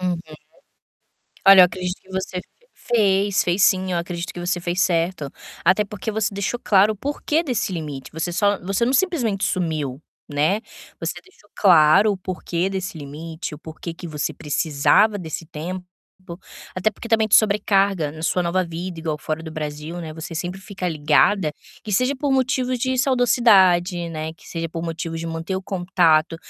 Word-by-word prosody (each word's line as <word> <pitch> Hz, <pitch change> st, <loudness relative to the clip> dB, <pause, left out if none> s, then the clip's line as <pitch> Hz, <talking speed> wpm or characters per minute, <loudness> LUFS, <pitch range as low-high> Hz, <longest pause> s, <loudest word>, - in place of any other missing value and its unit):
Uhum. 180 Hz, -2 st, -1 dB, 1.3 s
Olha, 195 Hz, -1 st, +10 dB
eu -, -, +9 dB
acredito 180 Hz, +1 st, -3 dB
que 190 Hz, -, -22 dB
você 190 Hz, -1 st, -3 dB, 0.3 s
fez, 200 Hz, -4 st, +2 dB
fez 180 Hz, +2 st, +1 dB
sim 185 Hz, -2 st, +3 dB
eu 175 Hz, -, +1 dB
acredito 170 Hz, 0 st, -4 dB
que 175 Hz, -, -7 dB
você 175 Hz, 0 st, -1 dB
fez 175 Hz, +2 st, -2 dB
certo, 170 Hz, -4 st, 0 dB, 0.3 s
até 185 Hz, +4 st, +4 dB
porque 210 Hz, +1 st, -5 dB
você 215 Hz, -1 st, -1 dB
deixou 200 Hz, +4 st, -2 dB
claro 200 Hz, +1 st, +4 dB
o -, -, -10 dB
porquê 290 Hz, -, -1 dB
desse 245 Hz, -, -2 dB
limite 150 Hz, -5 st, -6 dB
você 160 Hz, +2 st, -3 dB
só 205 Hz, +2 st, +2 dB
você 195 Hz, +5 st, 0 dB
não 250 Hz, -, +1 dB
simplesmente 245 Hz, -, +1 dB
sumiu, 155 Hz, -8 st, -2 dB, 0.3 s
né, 155 Hz, +9 st, +2 dB, 0.4 s
você -, -, -4 dB
deixou 365 Hz, -, -24 dB
claro 175 Hz, +2 st, +6 dB
o -, -, -3 dB
porquê 185 Hz, 0 st, -3 dB
desse 190 Hz, -2 st, -4 dB
limite, 155 Hz, +2 st, -7 dB
o -, -, -11 dB
porquê 160 Hz, +2 st, -8 dB
que 175 Hz, +1 st, -9 dB
você 150 Hz, -2 st, -3 dB
precisava 160 Hz, +8 st, +2 dB
desse 165 Hz, -2 st, -6 dB
tempo, 180 Hz, +4 st, -6 dB, 0.9 s
até 185 Hz, +4 st, +1 dB
porque 225 Hz, +2 st, -10 dB
também 220 Hz, -1 st, +3 dB
de -, -, +4 dB
sobrecarga 200 Hz, -6 st, +2 dB
na 160 Hz, +1 st, -9 dB
sua 180 Hz, +2 st, +1 dB
nova 180 Hz, +2 st, 0 dB
vida 170 Hz, +1 st, -6 dB
igual 160 Hz, -2 st, -2 dB
fora 155 Hz, +1 st, -4 dB
do 160 Hz, -, -7 dB
Brasil, 155 Hz, +2 st, -5 dB
né, 160 Hz, -2 st, -6 dB
você 160 Hz, +1 st, -7 dB
sempre 175 Hz, +4 st, -4 dB
fica 195 Hz, -2 st, -4 dB
ligada, 155 Hz, +2 st, +2 dB, 0.3 s
que 210 Hz, -, -6 dB
seja 255 Hz, +7 st, +2 dB
por 285 Hz, 0 st, -1 dB
motivos 255 Hz, -1 st, +1 dB
de 260 Hz, +2 st, 0 dB
saudozidade, 195 Hz, -9 st, +4 dB
né, 160 Hz, -1 st, -5 dB
que 160 Hz, -, -18 dB
seja 165 Hz, -1 st, -4 dB
por 165 Hz, 0 st, -5 dB
motivos 165 Hz, 0 st, -4 dB
de 165 Hz, -, -5 dB
manter 165 Hz, +3 st, -3 dB
o 190 Hz, -, -5 dB
contato, 175 Hz, -4 st, +2 dB
180 Hz, 175 wpm, -22 LUFS, 165-205 Hz, 1.3 s, Olha